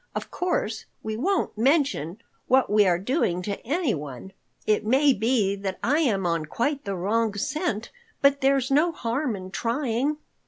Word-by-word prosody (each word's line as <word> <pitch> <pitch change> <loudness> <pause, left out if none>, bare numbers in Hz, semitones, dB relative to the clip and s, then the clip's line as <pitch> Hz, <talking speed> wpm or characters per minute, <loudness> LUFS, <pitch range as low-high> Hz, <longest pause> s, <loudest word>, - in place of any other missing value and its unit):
Of - - -5
course 290 -11 -2 0.2
we 220 0 -3
won't 360 - 0
mention 230 - +1 0.3
what 260 -4 +3
we 210 -1 +5
are 175 -1 +3
doing 185 - 0
to 200 +1 -4
anyone. 190 - -3 0.3
It 215 0 +2
may 270 +6 +4
be 220 -3 +1
that 195 -1 -4
I 290 +6 +2
am 210 - +1
on 165 -2 0
quite 280 - -1
the 200 -1 -2
wrong 210 +4 0
scent. 245 - -2 0.3
But 280 0 +3
there's 270 -1 +2
no 310 +5 +4
harm 245 -2 -2
in 185 -1 -8
trying." 250 +5 -1
230 Hz, 160 wpm, -25 LUFS, 195-280 Hz, 0.3 s, we